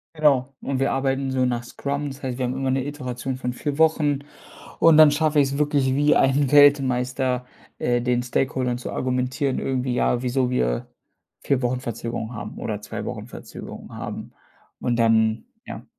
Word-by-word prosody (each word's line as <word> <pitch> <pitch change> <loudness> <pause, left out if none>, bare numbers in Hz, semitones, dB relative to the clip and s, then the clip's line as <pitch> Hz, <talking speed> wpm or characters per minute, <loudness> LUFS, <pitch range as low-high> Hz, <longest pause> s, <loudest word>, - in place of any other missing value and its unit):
Genau 140 -3 +2
und 135 -1 -2
wir 135 - +1
arbeiten 135 0 0
so 130 -1 +1
nach 120 -1 -1
Scrum. 140 +3 -3
Das 135 +1 -11
heißt, 130 -1 -3
wir 130 - -1
haben 125 - -2
immer 135 -1 -1
'ne 130 0 0
Iteration 130 -3 -4
von 125 -1 -3
4 140 +3 -4
Wochen 155 -3 +3 0.6
und 165 -1 +6
dann 155 -1 +8
schaffe 150 0 +2
ich 135 - +1
es 140 - -3
wirklich 145 -3 +1
wie 145 +2 +3
ein 135 0 +3
Weltmeister, 130 -3 +3 0.3
äh, 120 0 +1
den 125 0 0
Stakeholdern 125 0 -1
zu 125 - -6
argumentieren, 130 +2 -1
irgendwie, 130 -1 -1
ja, 125 0 +1
wieso 125 0 0
wir - - 0 0.5
4 135 -2 0
Wochen 125 0 -1
Verzögerung 115 -1 -5
haben 105 -1 -7
oder 105 -2 -4
2 - - -6
Wochen - - -6
Verzögerung - - -10
haben. - - -6 0.5
Und 120 - 0
dann 110 -1 +2 0.2
ja. - - -8
130 Hz, 175 wpm, -23 LUFS, 125-140 Hz, 0.6 s, dann